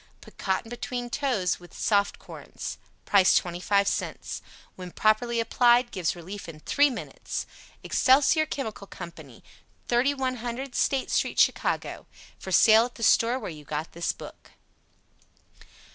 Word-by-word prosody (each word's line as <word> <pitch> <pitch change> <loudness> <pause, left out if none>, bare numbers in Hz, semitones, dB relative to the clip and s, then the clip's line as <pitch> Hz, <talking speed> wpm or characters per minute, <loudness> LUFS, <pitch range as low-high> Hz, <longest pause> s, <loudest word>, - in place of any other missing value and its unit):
Put - - -17
cotton 190 +3 -1
between 240 +1 -5
toes 235 -12 0
when 175 0 -14
soft 200 -2 +1
corns. - - -8 0.3
PRICE 195 -2 +5
25 185 +3 +1
CENTS - - -3 0.3
When 180 -1 -8
Properly 230 +4 +2
Applied, 240 +1 +3
Gives 180 -4 -1
Relief 180 +2 -8
in 155 -2 -10
3 285 - +3
Minutes. 255 - -5 0.4
EXCELSIOR 290 +4 +4
CHEMICAL 220 -8 -5
COMPANY, 160 -10 -11 0.4
3100 255 0 -1
State 270 +1 0
Street, - - 0
Chicago. - - +1 0.3
For 190 - -7
Sale 220 +5 +6
at 245 - -9
the 230 - -7
Store 230 +3 +4
where 220 -8 -6
you 150 -2 -11
got 150 +2 -4
this 170 0 -1
book. - - -13
220 Hz, 130 wpm, -26 LUFS, 180-250 Hz, 0.4 s, Sale